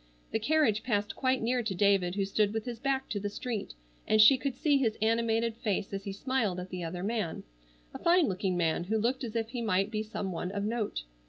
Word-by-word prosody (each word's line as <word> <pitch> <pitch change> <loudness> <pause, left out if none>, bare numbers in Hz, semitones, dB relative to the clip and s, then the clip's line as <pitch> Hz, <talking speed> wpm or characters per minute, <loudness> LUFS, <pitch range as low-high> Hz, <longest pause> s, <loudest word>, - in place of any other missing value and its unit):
The 220 - 0
carriage 230 -4 +2
passed 205 -3 -1
quite 260 -2 +1
near 245 +2 +1
to 220 -5 -3
David 195 -2 +3
who 200 -1 0
stood 205 +1 +1
with 220 - -2
his 240 -2 -5
back 270 +1 -1
to 205 - -2
the 205 +1 -3
street, 215 - -4 0.3
and 215 - +3
she 220 +6 +9
could 260 0 -3
see 290 +1 +3
his 225 -5 0
animated 225 +1 +1
face 205 -4 -2
as 195 0 -4
he 200 - -3
smiled 210 -3 -1
at 180 +1 -7
the 180 -1 -4
other 175 +2 -4
man, 210 -5 -2 0.5
a - - -7
fine 345 -1 +4
looking 185 -1 -1
man 170 0 +1
who 220 +4 0
looked 245 +5 0
as 235 -2 -5
if 225 -1 -1
he 240 0 -4
might 195 -2 +1
be 215 -1 -1
some 210 -3 -4
one 180 +1 -3
of 200 -1 -2
note. 215 - -2
215 Hz, 235 wpm, -30 LUFS, 195-240 Hz, 0.5 s, she